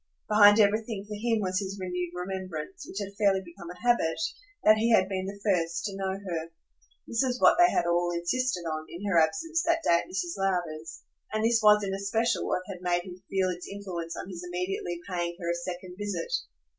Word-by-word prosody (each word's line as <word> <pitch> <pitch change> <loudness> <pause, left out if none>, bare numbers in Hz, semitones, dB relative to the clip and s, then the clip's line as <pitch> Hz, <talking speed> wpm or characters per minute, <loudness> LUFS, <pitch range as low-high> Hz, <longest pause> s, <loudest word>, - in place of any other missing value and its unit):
Behind 210 0 +7
everything 215 0 +2
for 210 - -6
him 225 +1 0
was 185 -1 0
his 195 0 -4
renewed 180 -1 -3
remembrance, 185 -2 -5
which - - -9
had 200 -1 -4
fairly 195 -2 +3
become 170 0 -11
a 180 - -9
habit, 240 -9 +2 0.4
that 215 0 +7
he 230 +2 +2
had 190 -4 +5
been 190 -1 -3
the 200 +1 -7
first 170 -4 +1
to 200 -2 -3
know 190 -1 -2
her. 170 -5 -4 0.6
This 230 - 0
was 250 -1 0
what - - +6
they 350 0 +8
had - - +1
all 175 0 +2
insisted 180 +6 0
on, 155 -2 -4
in 180 +4 -7
her 190 -4 +4
absence, 325 - +1
that 335 -1 +1
day 170 -10 +4
at - - -12
Mrs. 355 -2 -2
Lowder's; 165 -4 -2 0.3
and 215 +1 0
this 230 0 +3
was 210 -1 +6
in 195 -1 -2
especial 215 +3 0
what 180 - 0
had 185 -2 -8
made 175 -1 +1
him 185 0 -10
feel 190 -1 +1
its 180 0 -5
influence 180 -5 -5
on - - -6
his 180 -2 -7
immediately 180 0 -3
paying 175 -2 -2
her 170 -1 -1
a - - +1
second 180 +1 -6
visit. 200 -5 -3
190 Hz, 210 wpm, -28 LUFS, 175-210 Hz, 0.6 s, they